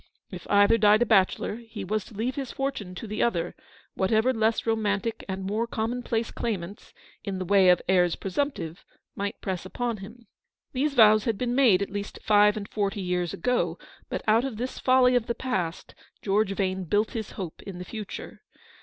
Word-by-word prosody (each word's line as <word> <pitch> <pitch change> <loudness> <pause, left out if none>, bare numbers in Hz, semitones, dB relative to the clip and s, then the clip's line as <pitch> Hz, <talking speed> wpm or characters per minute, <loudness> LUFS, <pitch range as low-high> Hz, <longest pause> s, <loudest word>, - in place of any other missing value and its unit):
If - - -8
either 205 +3 +5
died 210 +2 +5
a - - -2
bachelor, 205 0 +2
he 225 -3 -8
was 215 +2 -1
to 220 - -14
leave 235 +5 -1
his 270 -2 -5
fortune 265 -10 -4
to 205 - -6
the 215 0 -3
other, 175 -7 0 0.4
whatever 220 +6 +2
less 225 -1 +1
romantic 220 -1 -1
and 190 0 -3
more 215 +4 -1
common 235 +2 -2
place 230 -1 -2
claimants, 200 -3 -5 0.3
in 200 -3 -3
the 185 - -3
way 195 0 +5
of 180 - +4
heirs 180 -2 +3
presumptive, 195 - -3 0.3
might 200 +2 -4
press 185 -3 -3
upon 235 +4 -3
him. 225 +5 -11 0.5
These 280 +2 0
vows 215 -2 +6
had 225 -4 0
been 245 +1 -1
made 235 -8 +5
at 200 - -7
least 205 0 -5
five 210 0 +5
and 200 -1 -5
forty 205 -1 -2
years 180 -2 -1
ago, 250 +7 0 0.3
but - - -3
out 220 +2 +4
of 265 -5 -4
this 250 +3 -4
folly 255 -1 +4
of 245 -2 +1
the 235 - -1
past 185 -10 -3 0.3
George 200 0 +1
Vane 190 -1 -1
built 205 +6 +1
his 220 -3 -5
hope 180 -5 -7
in 195 -3 -8
the 180 - -7
future. 215 0 -7
210 Hz, 190 wpm, -26 LUFS, 195-235 Hz, 0.5 s, vows